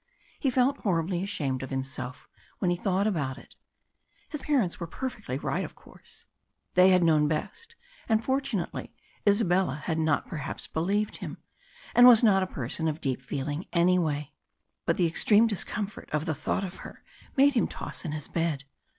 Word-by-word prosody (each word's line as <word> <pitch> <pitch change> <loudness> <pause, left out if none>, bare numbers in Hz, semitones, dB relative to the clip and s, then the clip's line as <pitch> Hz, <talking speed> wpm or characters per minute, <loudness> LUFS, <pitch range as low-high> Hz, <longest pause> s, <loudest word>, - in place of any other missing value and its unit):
He 275 - +1
felt 255 +2 +2
horribly 175 -2 0
ashamed 145 -10 -2
of 130 - -6
himself 130 -1 -5 0.3
when 180 - +1
he - - +2
thought 190 +2 0
about 145 -11 -1
it. - - -15 0.7
His 300 -3 -5
parents 260 - +1
were 170 - -4
perfectly 210 - -5
right, - - -2
of - - -8
course; - - -15 0.5
they 185 +1 +6
had 185 -1 +5
known 155 -2 +4
best, 460 - -4 0.3
and 220 0 +2
fortunately 265 -9 -2 0.3
Isabella 185 - +2
had 160 -2 -1
not 155 -2 +1
perhaps 150 -4 -5
believed 200 +6 -1
him, - - -7 0.6
and 245 0 +8
was 240 -1 +9
not 195 -4 +5
a 185 - 0
person 145 +3 -3
of 155 0 -2
deep 135 -4 -2
feeling 145 +6 -4
anyway. 170 -5 +2 0.6
But - - +2
the 175 - +3
extreme 205 +6 +4
discomfort 210 -1 -2
of 150 +1 -1
the 160 - 0
thought 160 +6 -2
of 185 -1 -6
her - - -11 0.3
made 280 +1 +6
him 235 - +2
toss - - -7
in 160 - -3
his 150 -1 -5
bed. 165 -4 -1
175 Hz, 170 wpm, -28 LUFS, 150-210 Hz, 0.7 s, was